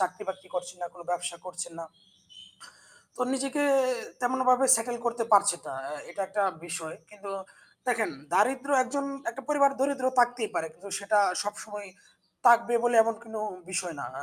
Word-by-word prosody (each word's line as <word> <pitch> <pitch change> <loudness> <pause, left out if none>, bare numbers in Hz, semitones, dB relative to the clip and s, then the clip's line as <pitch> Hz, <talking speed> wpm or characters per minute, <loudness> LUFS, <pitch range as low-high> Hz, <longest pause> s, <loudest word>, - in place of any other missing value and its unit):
চাকরি-বাকরি 190 0 -3
করছেন 180 0 -4
না, - - -1
কোনো 175 -1 -12
ব্যবসা 175 0 -2
করছেন 180 -1 -6
না - - -5 1.3
তো - - -9
নিজেকে 275 +2 -1 0.6
তেমনভাবে 255 +1 +3
সেটল 240 +1 -1
করতে 235 -1 0
পারছেন 200 -3 +5
না। - - -5
অ্যা 150 - -5
এটা 195 - -3
একটা 205 - 0 0.2
বিষয়। 160 -2 -5 0.2
কিন্তু, 200 -1 -9 0.6
দেখেন 235 -3 +1 0.2
দারিদ্র্য 265 +5 +3
একজন 280 +2 -2 0.3
একটা 270 +3 -9
পরিবার 280 -2 +5
দরিদ্র 270 -2 +1
থাকতেই 245 -2 +3
পারে। 160 - 0
কিন্তু 200 +3 -12
সেটা 205 +1 +2 0.2
সবসময় 205 0 -6 0.6
থাকবে 235 0 +6
বলে 240 -1 +3
এমন 230 0 0
কোনো 220 -1 -6 0.3
বিষয় 180 -2 -2
না। - - -4 0.2
আ - - -6
215 Hz, 155 wpm, -28 LUFS, 185-250 Hz, 1.3 s, থাকবে